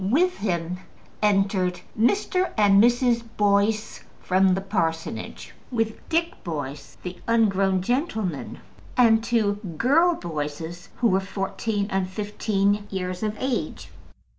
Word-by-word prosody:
With 360 - +2
him 180 -3 -2 0.4
entered 195 -3 +2
Mr. 365 - +1
and 205 -1 +6
Mrs. 240 0 +3 0.2
Boyce, 210 +1 +1 0.2
from 185 0 +3
the 190 - -2
parsonage, 165 -5 -3 0.2
with 225 -3 0 0.2
Dick 335 +1 -1
Boyce, 145 -4 -6
the 180 0 -6
ungrown 195 -5 +3
gentleman, 220 - -2 0.4
and 225 -3 +5
two 215 -4 +1 0.2
girl 330 - +4
Boyces, 160 - -5
who 240 - +2
were 190 - +3
fourteen 200 +2 -2
and 190 -1 0
fifteen 205 0 0
years 185 -2 -4
of 215 0 -2
age. 260 0 -3
205 Hz, 115 wpm, -24 LUFS, 185-230 Hz, 0.4 s, and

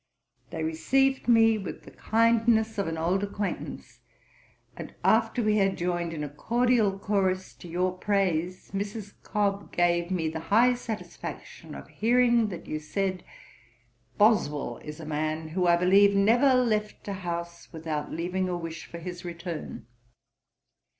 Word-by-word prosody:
They 160 - -4
received 260 +14 +1
me 225 -2 +5
with 195 - -7
the - - -13
kindness 225 -1 +2
of 200 - 0
an 165 0 -3
old 175 +4 +1
acquaintance; 205 0 -5 0.8
and - - -9
after 245 - +3
we 215 0 +2
had 195 -1 +2
joined 175 -1 -1
in 155 -2 -4
a - - -3
cordial 230 - +1
chorus 190 -2 -1
to - - -11
your 180 +2 -1
praise, 185 -3 -1
Mrs. 200 +1 -5
Cobb 200 -1 -1
gave 175 0 +1
me 175 -4 -1
the 160 +1 -3
high 240 +4 +5
satisfaction 230 -3 -7
of - - -9
hearing 235 0 +3
that 175 -4 -8
you 155 - -4
said, 185 +4 -2 0.9
"Boswell 150 - +2
is 150 +1 -9
a 160 - -8
man 155 +1 -2
who 180 +2 0
I 170 - +6
believe 200 +3 +5
never 240 +7 +4
left 215 -5 0
a 200 - -2
house 170 -2 -6
without 160 -2 -4
leaving 180 +3 -2
a 175 - -1
wish 165 -1 -7
for 170 - -8
his 175 +1 -7
return." 170 - -6
190 Hz, 150 wpm, -27 LUFS, 170-215 Hz, 0.9 s, I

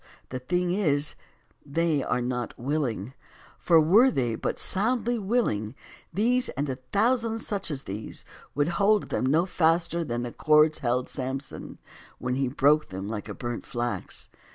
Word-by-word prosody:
the 130 - -4
thing 175 +7 0
is, 150 -7 +1 0.5
they 155 0 +1
are 125 -1 -1
not 125 -1 -3
willing; 125 -5 -2 0.5
for 165 -2 +5
were 200 +12 +6
they 125 - 0
but - - -2
soundly 235 +4 +1
willing, 190 - 0 0.4
these, 245 +7 +2
and 140 0 -2
a 130 - -4
thousand 230 +1 +2
such 205 -5 -2
as 140 -3 -4
these, 105 +3 -7 0.3
would 145 +1 +2
hold 200 +4 +2
them - - -1
no 160 +6 +3
faster 170 -1 +1
than 120 -5 -3
the 120 - -4
cords 155 0 +4
held 125 0 0
Samson, 135 0 -5 0.4
when 125 0 -2
he 135 +1 0
broke 145 +4 +3
them 95 +1 -5
like 105 -1 -5
burnt 120 -1 -4
flax. 120 -1 -3
150 Hz, 155 wpm, -27 LUFS, 125-190 Hz, 0.5 s, were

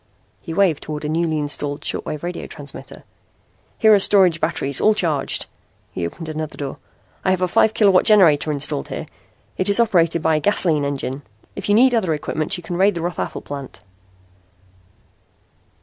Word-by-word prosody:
He 165 - -8
waved 170 -3 +2
toward 150 0 -6
a - - -2
newly 160 0 0
installed 145 0 -3
short - - -4
wave 150 0 -5
radio 175 0 -5
transmitter. 145 -3 -11 0.7
"Here 220 -1 +5
are 205 - +5
storage 185 -4 +4
batteries, 140 -4 -1
all 215 0 +4
charged." 160 -9 -1 0.5
He 85 -2 -3
opened 165 - -9
another 155 -1 -5
door. 140 -2 -5 0.5
"I - - 0
have 185 -1 +1
a - - +2
five 215 +4 +2
kilowatt 195 -4 +4
generator 165 -8 +4
installed 140 - -2
here. - - -6 0.5
It 185 - +2
is 200 - +5
operated 170 -8 +2
by 160 -1 +2
a - - 0
gasoline 160 -5 +2
engine. 140 -1 -4 0.3
If 200 0 -5
you 205 - +4
need 250 +3 +5
other 185 -9 +1
equipment 155 +4 -3
you 175 - -10
can 175 +1 -5
raid 195 +2 +3
the 170 - -4
Rothafel 175 0 -4
plant." 140 -8 -8
165 Hz, 175 wpm, -20 LUFS, 150-190 Hz, 0.7 s, Here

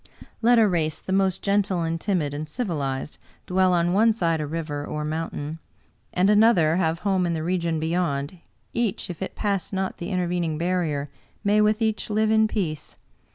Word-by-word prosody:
Let 240 +1 +5
a 225 -2 +6
race 160 -4 0
the 190 - -4
most 190 -2 +1
gentle 200 -3 +1
and 165 0 -2
timid 170 -8 0
and 150 +1 -5
civilized 150 - -3 0.3
dwell 185 0 +2
on 175 0 +2
one 220 +3 +4
side 165 -7 0
a 150 - -3
river 155 -2 -4
or 150 +1 -4
mountain, 155 0 -4 0.5
and 180 +2 +2
another 205 -7 +5
have 165 -2 0
home 190 -3 +2
in 170 - -1
the 155 - -3
region 170 -2 0
beyond, 160 -1 -1 0.3
each, 225 -6 -1
if 170 - -10
it 190 - -4
pass 200 -3 -1
not 190 -1 -2
the 170 - -4
in 185 - -1
tervening 175 -3 -1
barrier, 160 -5 -1 0.3
may 210 +1 +3
with 215 +1 +2
each 220 -1 -1
live 215 +1 +2
in 220 0 +4
peace. 175 -9 -3
175 Hz, 185 wpm, -24 LUFS, 160-200 Hz, 0.5 s, a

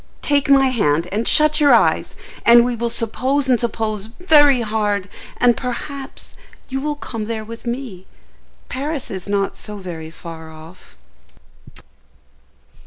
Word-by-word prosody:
Take 285 -1 +1
my 270 -1 +5
hand, 170 - +1
and 215 +4 -1
shut 305 0 +4
your 285 -1 +7
eyes, - - +1 0.3
and 235 0 +7
we 245 -1 -1
will 235 +1 -2
suppose 260 +5 -1
and 250 -3 +3
suppose 220 -3 -2
very 290 -7 +5
hard, 210 -3 -1 0.3
and, 245 -1 +4
perhaps, 270 +2 -5 0.4
you 270 0 -3
will 300 +1 -2
come 225 -6 -6
there 220 -1 -4
with 230 +2 -9
me. 235 -7 -5 0.6
Paris 285 +2 -4
is 190 0 -6
not 200 -1 0
so 210 -1 -4
very 170 -5 -7
far 160 -1 -10
off." 160 - -15
235 Hz, 140 wpm, -19 LUFS, 200-270 Hz, 0.6 s, your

